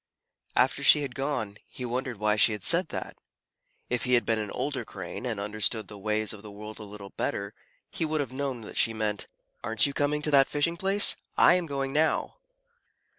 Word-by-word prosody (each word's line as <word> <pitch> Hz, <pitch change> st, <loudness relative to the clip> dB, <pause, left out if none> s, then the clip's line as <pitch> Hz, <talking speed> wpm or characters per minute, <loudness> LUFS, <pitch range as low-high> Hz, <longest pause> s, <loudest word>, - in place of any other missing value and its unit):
After -, -, +2 dB
she 150 Hz, -, +6 dB
had 135 Hz, -3 st, -5 dB
gone, 125 Hz, -7 st, -3 dB
he 125 Hz, -, -7 dB
wondered 125 Hz, 0 st, -3 dB
why 105 Hz, 0 st, +2 dB
she 110 Hz, +1 st, +4 dB
had 105 Hz, -, -6 dB
said -, -, +4 dB
that. -, -, -5 dB, 0.7 s
If 125 Hz, -1 st, -1 dB
he 125 Hz, 0 st, +3 dB
had 120 Hz, -3 st, +2 dB
been 110 Hz, 0 st, +1 dB
an 105 Hz, -1 st, -4 dB
older 140 Hz, +5 st, -3 dB
Crane, 125 Hz, -, -7 dB
and 110 Hz, -4 st, -3 dB
understood 110 Hz, +2 st, 0 dB
the 105 Hz, -, -9 dB
ways 110 Hz, +1 st, -1 dB
of 105 Hz, -, -10 dB
the 105 Hz, -, -10 dB
world 105 Hz, +2 st, -9 dB
a -, -, -7 dB
little 100 Hz, -1 st, -10 dB
better, -, -, -3 dB, 0.4 s
he -, -, -3 dB
would 155 Hz, -1 st, 0 dB
have 135 Hz, -3 st, -3 dB
known 135 Hz, -3 st, -3 dB
that 105 Hz, -, -9 dB
she 115 Hz, 0 st, +4 dB
meant, 105 Hz, -2 st, -2 dB, 0.4 s
"Aren't 110 Hz, +1 st, +2 dB
you 140 Hz, -, -1 dB
coming 150 Hz, +1 st, 0 dB
to 150 Hz, -, +1 dB
that 135 Hz, -1 st, +6 dB
fishing 150 Hz, +3 st, +1 dB
place? 195 Hz, +3 st, +4 dB, 0.2 s
I -, -, +7 dB
am 180 Hz, -2 st, +1 dB
going 135 Hz, -2 st, -2 dB
now." 155 Hz, +1 st, +1 dB
120 Hz, 210 wpm, -28 LUFS, 105-145 Hz, 0.7 s, I